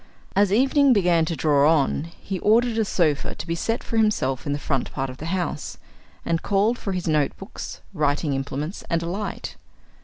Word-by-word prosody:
As 200 0 +4
evening 270 +4 +4
began 175 -6 +3
to 165 - -2
draw 150 -1 +4
on, 150 -1 +1
he 195 -2 -4
ordered 225 +3 +3
a 220 - +2
sofa 155 -7 0
to - - -6
be 165 - -2
set 225 +8 -2
for 230 - -3
himself 145 - +1
in - - 0
the 145 - 0
front 135 -3 -2
part 135 -1 -3
of 130 - -12
the 160 - -6
house, 175 -4 -3 0.5
and 165 0 0
called 205 +4 +1
for 195 - -3
his 180 -2 -3
notebooks, 155 +6 -2
writing 150 -2 0
implements, 140 +5 -4
and 170 -1 0
a - - -4
light. 200 +4 -4
170 Hz, 190 wpm, -24 LUFS, 150-205 Hz, 0.5 s, As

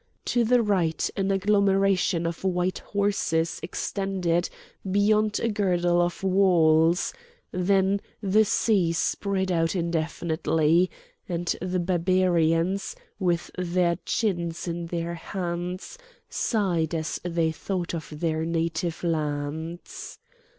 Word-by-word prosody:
To 240 - +2
the 240 +1 +3
right 180 -6 +1
an 195 -1 0
agglomeration 195 -3 +2
of 170 +1 -4
white 180 -1 0
houses 200 -5 0
extended 180 -1 -1 0.4
beyond 210 +1 +3
a - - 0
girdle 175 -5 +2
of 175 +2 -2
walls; 175 - +4 0.4
then 195 +2 +2 0.2
the 210 +1 +3
sea 195 -5 +2
spread 190 +4 0
out 165 +1 +1
indefinitely; 165 0 +1 0.4
and 175 0 -1
the 180 0 -1
Barbarians, 175 0 +1 0.2
with 175 -3 0
their 175 -1 +1
chins 175 -6 -1
in 170 0 -3
their 170 0 -3
hands, 180 - -5 0.3
sighed 175 -7 0
as 160 0 -2
they 165 -2 0
thought 175 +3 -3
of 160 -2 -5
their 160 +1 -1
native 165 +1 -2
lands. 160 - -3
175 Hz, 110 wpm, -26 LUFS, 165-195 Hz, 0.4 s, walls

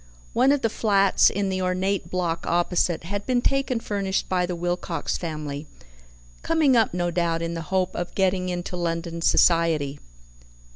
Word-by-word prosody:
One 255 +3 +4
of 285 -1 +1
the 225 - +3
flats 200 -3 +3
in 200 0 -1
the 185 0 -2
ornate 185 +2 -1
block 175 -2 -2
opposite 175 -1 +1
had 200 +4 -4
been 250 -1 +2
taken 270 -1 0
furnished 200 -3 -2
by 180 -1 0
the 180 - -3
Wilcox 175 0 -2
family, 150 -3 -5 0.7
"coming 315 -5 +3
up, 225 -3 +3
no 175 0 -1
doubt, 170 -1 0
in 165 0 -3
the 165 - -4
hope 185 -1 0
of 175 0 -4
getting 185 -1 +1
into 180 0 -4
London 170 -1 -3
society." 165 -5 +3
180 Hz, 160 wpm, -24 LUFS, 170-200 Hz, 0.7 s, One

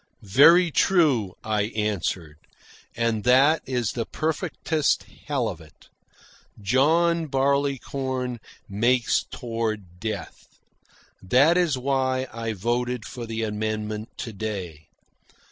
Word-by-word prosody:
"Very 165 - +6
true," 140 - +2
I 105 -1 0
answered. 90 -7 -2 0.6
"And 115 -2 0
that 135 +6 +5
is 125 -4 -1
the 115 -2 -4
perfectest 155 -1 -1 0.2
hell 135 -5 0
of 85 -5 -6
it. 80 -1 -19 0.7
John 160 +10 +2
Barleycorn 135 -2 -1 0.3
makes 120 +4 +1
toward 110 -6 -4
death. 105 -3 -6 0.7
That 135 - +4
is 175 -6 +2
why 130 0 0
I 115 -1 -3
voted 120 +3 -2
for 120 -3 -7
the 115 0 -3
amendment 110 0 -3
to 115 -3 -6
day. 95 -7 -6
120 Hz, 105 wpm, -24 LUFS, 105-135 Hz, 0.7 s, Very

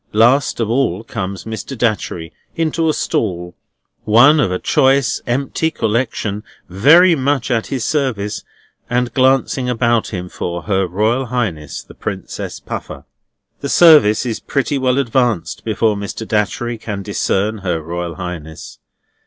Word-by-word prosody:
Last 120 +6 +3
of 115 - 0
all 115 -5 0
comes 100 -4 -5
Mr. 110 +4 -6
Datchery 100 -8 -1 0.2
into 165 0 0
a - - +4
stall, 90 -9 -2 0.5
one 120 +8 +6
of 115 -10 +1
a 90 - 0
choice 135 +4 +2
empty 135 +6 0
collection 110 -4 -2 0.2
very 155 - +6
much 135 -3 0
at 115 -2 0
his 130 -5 -3
service, 125 -9 -1 0.5
and 120 -1 0
glancing 130 -1 +2
about 120 -1 +1
him 90 -3 -5
for 85 -1 -5
Her 95 -2 0
Royal 110 +8 0
Highness 95 - -3
the - - -15
Princess - - -6
Puffer. - - -7 0.5
The 140 - -4
service 150 -11 +6
is 115 -3 -3
pretty 140 +1 -1
well 130 0 +1
advanced 120 -6 0
before 110 -1 +1
Mr. 100 +2 -6
Datchery 115 +2 -1
can 100 -3 -5
discern 105 +3 -1
Her 90 -4 -2
Royal 85 +1 -5
Highness. 80 -2 -8
115 Hz, 140 wpm, -17 LUFS, 100-130 Hz, 0.5 s, one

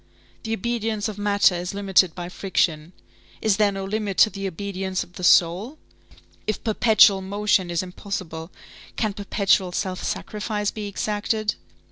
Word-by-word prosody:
The 225 - -3
obedience 225 -1 -2
of 210 -1 -7
matter 205 -2 +3
is 180 +2 -4
limited 190 -4 +3
by 175 -1 -5
friction; 175 -4 -1 0.5
is 215 -2 +2
there 210 -1 +3
no 195 -1 -5
limit 205 -1 -3
to 215 - +1
the 195 -1 -4
obedience 190 0 -3
of 175 - -19
the 180 - -9
soul? 180 - +3 0.7
If 215 - -2
perpetual 215 -3 +5
motion 200 -1 +1
is 170 +1 -1
impossible, 180 -3 -6 0.4
can 215 -3 -1
perpetual 195 -2 +1
self 185 0 -3
sacrifice 210 -1 -2
be 210 -1 -5
exacted? 210 +1 -1
200 Hz, 145 wpm, -23 LUFS, 185-210 Hz, 0.7 s, perpetual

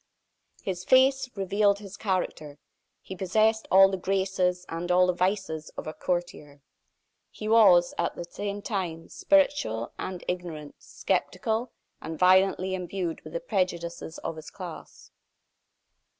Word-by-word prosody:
His 185 -2 -4
face 260 +2 +4
revealed 200 +1 +2
his 200 -1 -10
character. 180 -8 -3 0.5
He 190 - -8
possessed 215 +4 +1
all 195 +1 +8
the 190 - -2
graces 190 -1 0
and 170 +2 -4
all 180 +1 +5
the 180 - +1
vices 180 -4 -1
of - - -5
a 155 - -5
courtier. 155 -6 -4 0.7
He 215 - -7
was, 195 -6 +6
at 170 - -1
the - - -5
same 200 +3 -5
time 175 -6 -4
spirituel 285 - +1
and 185 -1 -5
ignorant, 170 -5 -5
sceptical 230 0 -2 0.3
and 160 0 -6
violently 185 +1 +4
imbued 180 -2 -3
with - - -11
the - - -2
prejudices 170 - -3
of 165 - -5
his 155 - -9
class. 180 -4 -10
185 Hz, 135 wpm, -27 LUFS, 170-200 Hz, 0.7 s, all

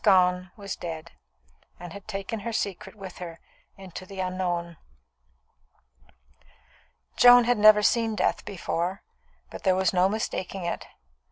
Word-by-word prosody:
Gone 185 -2 +4
was 200 -2 -5
dead, 165 -1 -7 0.7
and 175 -1 -9
had 200 -1 -11
taken 200 +1 -4
her 230 +3 -4
secret 205 -2 -3
with 190 -3 -10
her 170 -2 -8 0.4
into 190 -1 -9
the 195 0 -9
unknown. 175 -2 -2 2.4
Joan 245 0 +8
had 240 -1 +1
never 210 0 +7
seen 225 0 +2
death 185 - 0
before, 185 -1 -3 0.5
but - - -8
there 185 -2 +3
was 190 0 +1
no 185 +1 +4
mistaking 195 -3 -3
it. 170 - -4
190 Hz, 135 wpm, -26 LUFS, 180-210 Hz, 2.4 s, Joan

